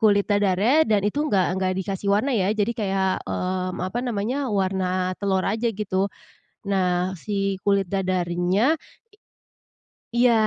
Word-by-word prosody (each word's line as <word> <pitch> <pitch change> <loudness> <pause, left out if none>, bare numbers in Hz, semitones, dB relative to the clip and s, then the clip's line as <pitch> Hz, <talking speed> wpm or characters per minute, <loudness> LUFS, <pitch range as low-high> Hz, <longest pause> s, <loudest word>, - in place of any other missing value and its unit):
kulit 205 -2 +4
dadarnya 205 +2 +2 0.2
dan 210 -2 +3
itu 210 - -4
enggak, 195 -11 +2
enggak 185 0 0
dikasih 195 +1 -3
warna 215 +8 +2
ya. 190 -2 +1
Jadi 215 +1 0
kayak, 195 -3 0
mmm, 185 0 -2
apa 185 +6 -2
namanya, 235 +1 -1 0.2
warna 190 -1 0 0.4
telur 190 -2 +1
aja 225 +4 0
gitu. 195 -2 -1 0.6
Nah 185 -1 +1
si 195 +2 -1
kulit 200 -2 +2
dadarnya 185 - +1 1.4
i 240 - +3
iya. 245 - +6
195 Hz, 140 wpm, -24 LUFS, 185-210 Hz, 1.4 s, iya